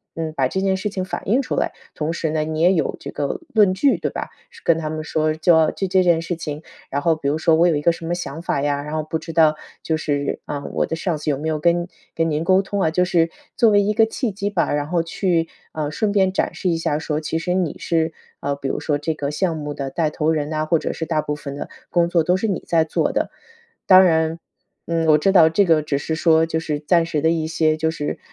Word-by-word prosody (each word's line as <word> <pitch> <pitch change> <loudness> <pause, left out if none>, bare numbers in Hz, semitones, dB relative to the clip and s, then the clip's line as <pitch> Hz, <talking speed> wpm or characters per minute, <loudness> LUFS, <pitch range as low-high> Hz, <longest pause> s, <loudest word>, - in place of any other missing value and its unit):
嗯， 160 -1 -3
把 130 -2 +3
这 190 +8 -2
件 190 -1 +1
事 210 +2 -2
情 190 -2 -3
反 - - -6
映 245 +6 +3
出 265 - -3
来， - - 0 0.2
同 155 +1 -2
时 165 -1 -2
呢， 155 0 0
你 155 0 -3
也 180 +3 +5
有 165 - 0
这 - - -7
个 145 - -3
论 210 -4 +5
据， 260 +9 +2
对 - - -3
吧？ - - -5 0.2
是 - - -17
跟 165 - +3
他 155 -2 -3
们 155 0 -4
说， 155 0 0
娇 160 0 +3
就 195 - -3
这 185 0 +3
件 170 -2 +3
事 170 +1 -3
情， 155 -3 -6 0.3
然 140 - -2
后 165 +1 +2
比 155 -3 -4
如 150 - 0
说 160 0 +3
我 170 +2 +4
有 165 - +2
一 145 - -1
个 170 - +4
什 165 - -9
么 170 - -1
想 160 -3 -6
法 155 -4 -1
呀， 145 0 0
然 150 +1 -7
后 155 - -1
不 155 +1 -3
知 165 +1 -8
道 155 -1 +4 0.3
就 160 - 0
是， 145 -2 -2
嗯， 145 -1 -5
我 - - +1
的 - - -3
上 165 -1 -1
司 150 - -4
有 140 - +1
没 150 +3 -4
有 155 -1 0
跟 170 +2 +2 0.3
跟 165 0 +1
您 155 +1 -1
沟 185 +3 +4
通 195 +1 -3
啊， 160 - +2
就 180 +2 +2
是 170 -2 +2 0.3
作 230 - +5
为 205 -1 +5
一 205 +1 +1
个 220 +1 +4
契 225 +1 -3
机 200 +1 -3
吧， 205 - 0
然 145 0 -1
后 170 0 0
去， 165 -1 0 0.2
嗯， 150 -2 -3
顺 205 +6 0
便 190 -2 +2
展 - - 0
示 - - -4
一 170 - +1
下， 150 -2 -1
说 155 -1 -2
其 160 +1 -2
实 180 +2 -1
你 180 -4 -1
是， 165 -1 0 0.3
啊， 140 0 -1
比 140 -1 -5
如 - - -2
说 145 -2 0
这 150 +2 -2
个 145 -2 -3
项 165 +2 0
目 150 -1 -5
的 140 -1 -4
带 155 +3 0
头 155 +1 0
人 150 -2 -1
呐， 155 0 -1
或 160 +1 +2
者 - - -3
是 160 - -4
大 155 -1 0
部 150 0 -3
分 140 -1 -7
的 145 - -6 0.2
工 170 -1 +2
作 170 -2 +2
都 180 +3 +2
是 195 +4 -1
你 195 -5 -2
在 165 -1 +3
做 160 - 0
的。 - - 0 0.6
当 185 0 +8
然 160 -2 +2 0.5
嗯， 165 -1 0
我 155 -1 +6
知 170 +6 +2
道 170 -5 +7
这 180 +5 +3
个 165 -3 +4
只 145 -2 -1
是 160 - -3
说， 160 0 +4
就 160 0 -1
是 150 -2 -3
暂 165 +2 +2
时 155 -3 -2
的 160 - +3
一 165 -1 0
些， 155 -1 +1
就 160 +1 0
是 150 -2 -4
160 Hz, 295 characters per minute, -21 LUFS, 155-175 Hz, 0.6 s, 当